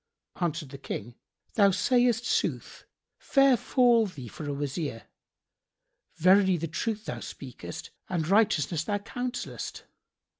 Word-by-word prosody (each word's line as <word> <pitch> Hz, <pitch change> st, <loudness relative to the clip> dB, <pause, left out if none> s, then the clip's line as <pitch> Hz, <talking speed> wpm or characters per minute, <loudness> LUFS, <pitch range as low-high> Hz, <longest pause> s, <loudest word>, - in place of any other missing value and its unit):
Answered 165 Hz, -4 st, -2 dB
the 140 Hz, 0 st, -9 dB
King, 120 Hz, -3 st, -6 dB, 0.4 s
"Thou 200 Hz, -3 st, +5 dB
sayest 240 Hz, +4 st, +2 dB
sooth! -, -, -1 dB, 0.3 s
Fair 275 Hz, -2 st, +4 dB
fall 240 Hz, -2 st, +3 dB
thee 140 Hz, -10 st, -9 dB
for 145 Hz, +6 st, -7 dB
a -, -, -1 dB
Wazir! 140 Hz, -, -3 dB, 1.1 s
Verily 190 Hz, +1 st, +5 dB
the 165 Hz, +1 st, -3 dB
truth 210 Hz, +6 st, -3 dB
thou -, -, -4 dB
speakest -, -, -8 dB, 0.2 s
and 165 Hz, -4 st, -1 dB
righteousness 185 Hz, -6 st, +2 dB
thou 205 Hz, +4 st, -1 dB
counsellest. 245 Hz, +4 st, -5 dB
190 Hz, 120 wpm, -28 LUFS, 155-230 Hz, 1.1 s, Thou